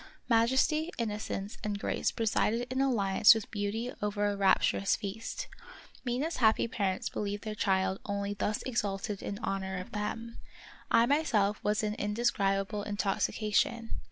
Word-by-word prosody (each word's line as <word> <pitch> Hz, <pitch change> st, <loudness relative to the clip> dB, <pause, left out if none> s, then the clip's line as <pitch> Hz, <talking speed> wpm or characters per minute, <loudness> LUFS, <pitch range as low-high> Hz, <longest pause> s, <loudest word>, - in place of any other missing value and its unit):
Majesty, 260 Hz, +8 st, +3 dB
innocence, 210 Hz, -2 st, -3 dB
and 210 Hz, -1 st, -1 dB
grace -, -, 0 dB
presided 225 Hz, +1 st, 0 dB
in 260 Hz, -, +1 dB
alliance 215 Hz, -5 st, +5 dB
with 225 Hz, -, -5 dB
beauty 220 Hz, +4 st, -2 dB
over 205 Hz, 0 st, 0 dB
a 205 Hz, 0 st, +1 dB
rapturous 195 Hz, 0 st, +3 dB
feast. 220 Hz, +2 st, -5 dB, 0.6 s
Mina's 265 Hz, +7 st, -1 dB
happy 220 Hz, -1 st, +3 dB
parents 195 Hz, -5 st, -1 dB
believed 205 Hz, 0 st, -3 dB
their 215 Hz, -1 st, -4 dB
child 190 Hz, -2 st, +1 dB
only 200 Hz, 0 st, -2 dB
thus 205 Hz, +1 st, -2 dB
exalted 205 Hz, -4 st, -2 dB
in 200 Hz, -, -4 dB
honor 190 Hz, -1 st, -2 dB
of 185 Hz, -, -8 dB
them. 225 Hz, +2 st, -4 dB, 0.5 s
I 230 Hz, 0 st, +5 dB
myself 225 Hz, -8 st, +1 dB
was 210 Hz, +1 st, +1 dB
in 210 Hz, 0 st, 0 dB
an -, -, -9 dB
indescribable 205 Hz, -2 st, 0 dB
intoxication. 210 Hz, +2 st, 0 dB
210 Hz, 140 wpm, -31 LUFS, 200-230 Hz, 0.6 s, alliance